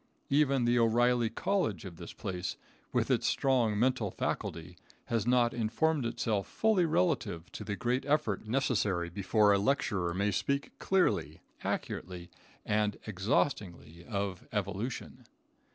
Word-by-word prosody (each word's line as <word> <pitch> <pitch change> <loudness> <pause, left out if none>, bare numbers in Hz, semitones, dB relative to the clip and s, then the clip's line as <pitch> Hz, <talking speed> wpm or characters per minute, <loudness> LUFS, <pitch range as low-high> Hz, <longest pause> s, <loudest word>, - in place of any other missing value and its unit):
Even 140 -3 +3
the 120 0 +3
O'Reilly 120 +1 +3
College 115 - -1
of 85 -3 -8
this 85 - -8
place, 90 -4 -4 0.3
with - - +1
its - - +2
strong 120 -6 +2
mental 120 -2 +1
faculty, 85 -1 -4 0.3
has 115 -1 -1
not 120 -1 +3
informed 120 +5 +1
itself 115 -4 -1
fully 220 -5 +2
relative 90 - 0
to - - -7
the 105 - -3
great 120 +6 0
effort 115 -8 0
necessary 105 -8 0
before 100 +2 +3
a 100 - +3
lecturer 100 -7 0
may 100 +2 +1
speak 140 +8 -1
clearly, 190 -1 +1 0.2
accurately 90 -1 -4 0.3
and 105 -1 +1
exhaustingly 95 - -1
of 100 -4 -3
evolution. 105 +4 -4
110 Hz, 130 wpm, -31 LUFS, 95-125 Hz, 0.3 s, Even